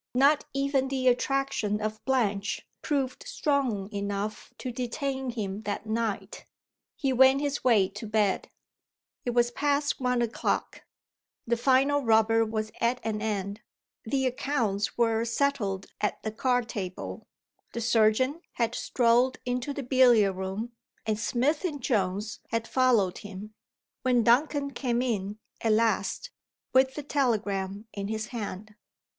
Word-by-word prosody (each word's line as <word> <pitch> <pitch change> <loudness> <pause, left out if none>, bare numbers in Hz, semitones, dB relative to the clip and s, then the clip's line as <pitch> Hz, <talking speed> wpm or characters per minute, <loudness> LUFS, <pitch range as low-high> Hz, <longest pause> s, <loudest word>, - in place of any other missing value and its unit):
Not 280 +3 +4
even 275 -1 +1
the 265 -1 -1
attraction 250 -4 0
of 215 0 -4
Blanche 210 -6 0 0.2
proved 275 -4 -1
strong 260 -10 0
enough 200 +2 -3
to 255 - -4
detain 265 +2 -3
him 210 -4 -4
that 205 0 -4
night. 215 -3 -2 0.5
He 270 -3 0
went 265 +2 +6
his 285 0 -2
way 220 -7 +5
to 210 +2 -8
bed. 210 -2 +1 0.8
It 245 -1 -1
was 240 0 +3
past 285 +2 0
one 250 -2 +1
o'clock. 230 -1 -2 0.6
The 235 - +1
final 270 +4 +3
rubber 225 -1 +4
was 215 -1 -3
at 240 +2 +2
an 215 -1 -2
end, 205 -1 -2 0.4
the 265 +4 0
accounts 240 -6 -1
were 225 -1 +2
settled 230 -6 0 0.2
at 210 - -1
the 220 - -2
card 245 +1 +1
table; 190 -5 -6 0.5
the - - -3
surgeon 235 +6 +2
had 235 -1 0
strolled 245 +1 +2
into 250 +2 -2
the 280 0 -4
billiard 240 -6 +5
room, 190 +5 -4 0.3
and 215 -1 0
Smith 260 +8 +1
and 310 -6 -2
Jones 210 -3 -1
had 230 0 -1
followed 240 -8 +2
him, 205 0 -9 0.5
when 250 -2 +3
Duncan 280 +4 +3
came 245 -3 -1
in, 210 -4 -2 0.3
at 225 -1 +3
last, 225 - +1 0.4
with 260 0 +4
the 295 - -5
telegram 210 -8 -1
in 200 -1 -4
his 215 0 -3
hand. 215 -2 -6
235 Hz, 140 wpm, -28 LUFS, 210-260 Hz, 0.8 s, went